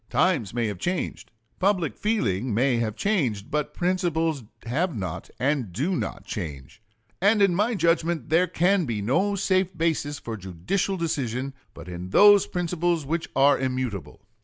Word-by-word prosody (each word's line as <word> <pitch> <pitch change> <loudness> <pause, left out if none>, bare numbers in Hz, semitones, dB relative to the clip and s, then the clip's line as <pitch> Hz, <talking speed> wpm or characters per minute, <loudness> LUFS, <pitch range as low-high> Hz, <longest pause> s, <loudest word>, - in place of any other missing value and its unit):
Times 160 - +1
may 120 0 -1
have 105 -4 -3
changed, 180 - -3 0.3
public 185 -5 +1
feeling 130 - 0
may 125 +1 +2
have 110 -3 -1
changed, 130 - -1
but 150 -1 -1
principles 165 -5 0 0.2
have 155 +7 -1
not 90 -5 -5
and 130 -6 0
do 145 - -1
not - - -4
change; 80 - -6 0.4
and 205 +3 +4
in 195 -3 +4
my 210 +6 +1
judgment 170 -2 +1
there 175 +3 +4
can 180 +1 +2
be 115 -5 -2
no 170 - +1
safe 185 -2 +1
basis 160 -3 0
for 115 -5 -6
judicial 95 - -2
decision 135 -5 -2 0.2
but - - -10
in 90 +1 -6
those 205 - +7
principles 175 -2 -1
which 165 +3 -2
are 140 +2 +5
immutable. 130 -6 -3
155 Hz, 155 wpm, -25 LUFS, 115-180 Hz, 0.4 s, those